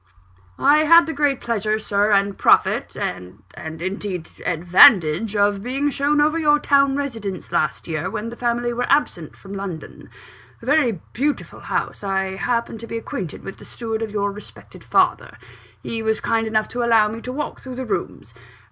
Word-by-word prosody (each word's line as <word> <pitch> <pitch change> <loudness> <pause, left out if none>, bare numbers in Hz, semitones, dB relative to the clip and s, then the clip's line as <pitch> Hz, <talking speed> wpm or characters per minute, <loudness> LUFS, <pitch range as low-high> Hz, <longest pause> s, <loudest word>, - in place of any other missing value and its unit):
"I 290 +2 +4
had 335 +2 +6
the 325 - -4
great 285 -2 +1
pleasure, 215 -2 -1
Sir, 205 -1 0
and 200 0 +2
profit, - - +2
and 90 0 -5
and, 160 +1 -8
indeed, 190 -3 -4 0.2
advantage 180 +3 +5
of 205 -1 +2
being 270 +5 -1
shown 285 +2 +1
over 305 +2 +2
your 295 -2 +4
town 280 -2 +3
residence 225 -12 -5
last 155 -3 -1
year, 155 -2 -3
when 225 +2 -4
the 235 - -8
family 240 0 -1
were 245 +1 -2
absent 230 - 0
from 195 0 -11
London. 195 -5 -7 0.5
A - - -14
very 265 -7 +3 0.2
beautiful 285 +4 -2
house - - -3
I 195 -1 -1
happen 235 +1 -2
to 230 - -9
be 230 +1 -4
acquainted 190 -7 -6
with 195 - -8
the - - -13
steward 225 -2 -5
of 225 - -3
your 205 -1 -1
respected 210 +1 -13
father: - - +1 0.5
he 225 -1 -4
was 220 0 0
kind 225 -1 0
enough 215 -1 0
to 245 - -3
allow 230 -3 +4
me 225 +2 -6
to 250 - -6
walk 295 +3 -5
through 260 -1 -8
the 260 +1 -5
rooms. 220 - -4
225 Hz, 180 wpm, -21 LUFS, 195-260 Hz, 0.5 s, had